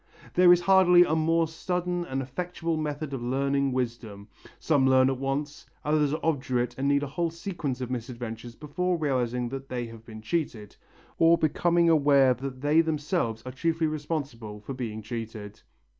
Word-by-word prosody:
There 180 0 +6
is 175 0 +5
hardly 180 -1 +6
a 160 - -1
more 165 +1 +2
sudden 175 +2 -2
and 135 -3 -3
effectual 170 +4 -3
method 150 -1 -3
of 135 - -4
learning 140 +2 0
wisdom. 115 -5 -4 0.3
Some 140 -4 +2
learn 130 0 +5
at 130 - -4
once, 140 +2 -3 0.2
others 150 -1 +2
are 155 - -1
obdurate 130 -6 0
and 135 +1 -1
need 140 0 +2
a - - -1
whole 165 +5 -2
sequence 165 -6 -4
of 125 0 -4
misadventures 120 -1 -6
before 175 +6 -2
realizing 125 -5 -1
that 135 +1 -7
they 125 -1 -3
have 115 -1 -11
been 110 -1 -11
cheated, 115 - -3 0.4
or 165 +1 +6
becoming 170 +2 +2
aware 140 -5 +5
that 130 +1 -7
they 150 +3 +4
themselves 150 - -2
are 130 - -5
chiefly 165 +5 0
responsible 140 -9 -4
for 110 +6 -7
being 110 -4 -5
cheated. 110 -2 -7
140 Hz, 170 wpm, -27 LUFS, 125-165 Hz, 0.4 s, There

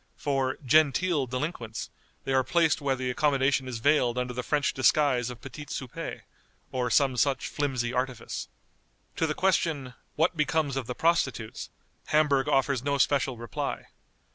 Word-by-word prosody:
For 135 0 -1
"genteel" 155 +2 +3
delinquents, 125 -4 -4 0.3
they 135 - -2
are 130 0 +4
placed 160 +2 +2
where 140 -2 +1
the 130 -1 -2
accommodation 135 -1 +1
is 125 -2 -4
veiled 125 -1 +2
under 125 0 -2
the 125 - -3
French 145 +2 0
disguise 130 -2 +3
of 125 -1 -9
petits 150 -1 -7
soupers, 130 -3 -7 0.5
or 125 -2 -1
some 135 +1 +3
such 135 +3 +1
flimsy 130 -4 -2
artifice. 125 -1 -3 0.7
To 160 - +1
the 150 - -2
question, 160 -8 0 0.2
"What 165 +3 +2
becomes 150 -2 0
of 135 -4 -3
the 125 - -4
prostitutes?" 135 -9 0 0.4
Hamburg 145 -3 +3
offers 135 -2 +2
no 140 0 0
special 135 -2 +1
reply. 115 -4 -4
135 Hz, 150 wpm, -28 LUFS, 125-150 Hz, 0.7 s, are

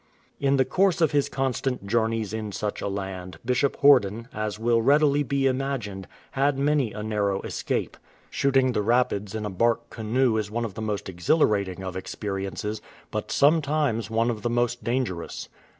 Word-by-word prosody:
*" - - -38
In 140 - +3
the 130 - +3
course 185 +6 +2
of 160 -3 +3
his 145 -2 +1
constant 130 -2 -2
journeys 110 -1 0
in 110 -1 -4
such 105 +1 -3
a - - -2
land, 95 -3 -5
Bishop 125 +3 +1
Horden, 115 -5 +5
as 105 -1 -3
will 115 +1 +2
readily 145 +3 +4
be 140 0 0
imagined, 130 -8 -2 0.2
had 140 0 +1
many 140 -4 +1
a 105 +1 -6
narrow 105 -2 0
escape. - - -3 0.3
Shooting 135 -2 +2
the 110 - 0
rapids 105 -3 +1
in 110 -1 -3
a 105 - -3
bark 115 +5 0
canoe 115 +1 +1
is 105 -1 -2
one 120 +2 -2
of 105 - -6
the 110 - -7
most 105 -2 -3
exhilarating 95 - +1
of 95 -1 -5
experiences, 100 +2 -4 0.3
but - - -3
some 155 +3 +4
times 140 -7 0
one 115 +2 +1
of 110 -2 -5
the 120 - -1
most 120 +1 0
dangerous. 120 -9 -3
115 Hz, 180 wpm, -25 LUFS, 105-135 Hz, 0.3 s, Horden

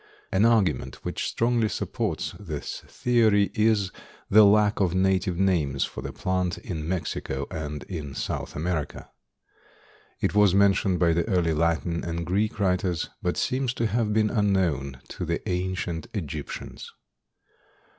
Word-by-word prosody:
An 95 +3 +3
argument 90 - +2
which - - -2
strongly 115 -2 +1
supports - - -2
this 80 -8 -5
theory 110 -5 +2
is 105 -3 +2 0.4
the 110 +2 +8
lack 105 +1 +4
of 95 -3 +1
native 95 -1 +1
names 80 -8 +1
for - - -5
the - - -5
plant 90 -1 -1
in 80 -3 -5
Mexico 75 -6 -3
and 75 -4 -5
in 75 -7 -6
South - - -4
America. 80 -1 -3 1.1
It - - 0
was 105 -2 +5
mentioned 100 -2 +3
by 85 -1 +3
the 85 +4 0
early 90 -6 +2
Latin 85 +1 0
and 85 0 -3
Greek 100 +5 0
writers, 90 -3 0
but - - -1
seems 130 -1 0
to 115 - 0
have 110 0 0
been 105 0 +2
unknown 90 - +1
to - - -5
the - - -3
ancient 90 -2 -2
Egyptians. 75 -6 -6
95 Hz, 140 wpm, -26 LUFS, 80-105 Hz, 1.1 s, the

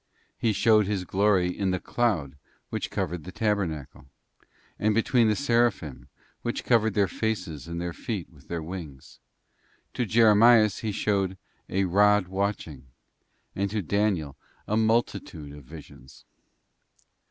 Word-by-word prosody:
He 115 - 0
showed 105 -1 +3
His 100 -3 -1
glory 95 -2 +2
in 100 -2 -1
the 95 0 0
cloud 90 - -1 0.4
which - - -3
covered 90 -3 -3
the 95 - -8
tabernacle;* 90 - -2 0.7
and 105 0 +2
between 115 +1 +3
the 105 - +2
Seraphim 115 - 0 0.3
which 120 - -3
covered 110 -3 +2
their 100 -2 +3
faces 95 -8 -3
and 85 0 -5
their 85 0 -3
feet 100 -3 -5
with 70 -4 -20
their 85 -2 -4
wings.t 80 -6 -9 0.8
To 115 - -5
Jeremias 110 -1 +5
He 110 - -2
showed 95 -2 0 0.3
'a 95 +1 +1
rod 100 +1 +3
watching;'{ 95 -8 -3 0.7
and 100 +1 -1
to 105 0 -2
Daniel 95 -6 0 0.3
a 105 - 0
multitude 110 -9 -1
of 75 -2 -13
visions. 75 -2 -14
100 Hz, 135 wpm, -26 LUFS, 85-110 Hz, 0.8 s, Jeremias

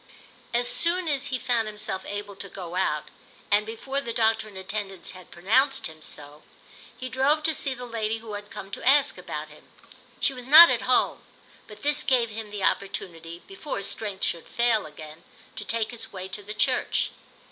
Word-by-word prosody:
As 240 0 +2
soon 345 +6 +2
as 285 -2 0
he 260 - -1
found 240 -3 0
himself 210 -3 -2
able 205 0 -5
to 195 0 -7
go 180 -3 -8
out, 150 -5 0 0.4
and 210 +1 +3
before 270 +5 -3
the 235 - -4
doctor 225 -1 +2
in 200 -3 -11
attendance 195 0 -4
had 185 -1 -13
pronounced 260 +10 +2
him 155 0 -5
so, 150 0 -9 0.6
he 255 - -5
drove 275 +4 +2
to 320 - +2
see 275 -3 -1
the 250 0 -7
lady 225 -2 -2
who 220 -1 -9
had 205 0 -7
come 195 - -8
to - - -6
ask 275 +2 +4
about - - -6
him. - - -18 0.5
She 275 - +2
was 250 -1 -9
not 320 +4 +11
at - - +1
home; - - +3 0.5
but 210 -1 -13
this 295 0 +3
gave 240 -4 +2
him 215 0 -6
the 205 -2 -5
opportunity, 170 -4 -2
before 385 -6 -6
his 200 - +2
strength 205 -3 -4
should 170 - -2
fall 230 -6 +2
again, 155 +1 -11 0.3
to - - -5
take 230 -1 -1
his 240 - -6
way 185 -1 -6
to 205 - -3
the 210 +1 -7
church. 255 +4 +1
220 Hz, 195 wpm, -26 LUFS, 195-255 Hz, 0.6 s, not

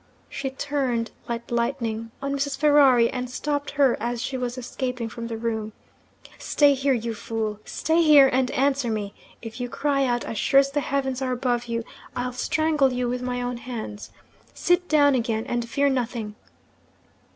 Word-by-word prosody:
She 270 - -3
turned 265 -4 -2 0.2
like 235 0 -4
lightning 235 -2 -1
on 275 0 -1
Mrs. 280 0 -1
Ferrari, 280 -5 +5
and 250 -1 -4
stopped 290 +3 -2
her 280 -4 +4
as 240 +2 -2
she 265 - -3
was 250 -1 -3
escaping 250 -1 -4
from 230 +1 -6
the 230 -1 -4
room. 220 -2 -3 0.7
'Stay 290 -1 +4
here, 270 0 +1
you 230 -1 -3
fool 220 -1 -3
stay 320 +2 +1
here, 295 -4 +8
and 260 -1 +1
answer 270 -2 +1
me! 210 -2 -3 0.3
If 225 +2 -7
you 245 - -3
cry 275 +2 +1
out, 240 -1 0
as 220 - -4
sure 275 - +5
as 275 0 +2
the 290 - 0
heavens 270 -2 -2
are 260 -1 -1
above 245 -1 -1
you, 230 -1 -2 0.3
I'll 250 0 -2
strangle 300 +1 +1
you 250 0 -1
with 250 +1 -2
my 250 0 -2
own 245 0 -3
hands. 230 -4 -7 0.5
Sit 355 0 +1
down 290 -2 +5
again 230 -3 0
and 240 -1 -2
fear 280 +4 +2
nothing. 240 -5 -2
250 Hz, 175 wpm, -24 LUFS, 235-275 Hz, 0.7 s, here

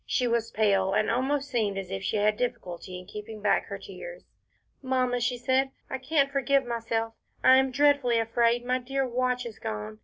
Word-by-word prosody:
She 250 - +1
was 235 -1 0
pale, 195 -3 +2
and 215 +2 +2
almost 270 +4 0
seemed 220 -7 -1
as 190 -1 -5
if 195 0 -3
she 200 +2 -1
had 210 +1 +2
difficulty 185 -6 -4
in 180 - -10
keeping 210 +2 -8
back 205 0 +2
her - - -5
tears. - - -10 0.6
"Mamma," 255 -2 0
she 245 +1 0
said, 260 +2 +1 0.2
"I 265 - -2
can't 275 +1 +1
forgive 275 0 +2
myself, 230 -1 -2 0.3
I 260 - +8
am 265 0 +3
dreadfully 280 -3 +3
afraid 235 +1 +1
my 255 +1 +1
dear 270 +1 -2
watch 250 0 0
is 225 -3 -8
gone. 105 0 -5
240 Hz, 190 wpm, -27 LUFS, 215-260 Hz, 0.6 s, I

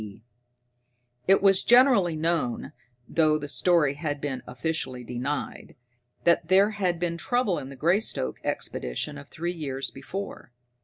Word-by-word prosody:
D. 105 +1 -10 1.0
It 195 +1 +5
was 195 -1 +5
generally 240 - +5
known 155 -6 -1 0.3
though 155 -2 +2
the 145 -1 -6
story 160 -2 +2
had 145 -1 -3
been 135 -3 -4
officially 125 -1 -3
denied 125 +5 -4 0.5
that 170 -1 +3
there 195 +3 +5
had 185 -5 -1
been 170 -1 -2
trouble 245 -6 0
in 130 - -8
the 140 - -9
Greystoke 160 - 0
Expedition 145 - -3
of 140 - -12
three 170 +2 -3
years 140 -5 -4
before. 140 -2 -7
160 Hz, 140 wpm, -26 LUFS, 135-180 Hz, 1.0 s, It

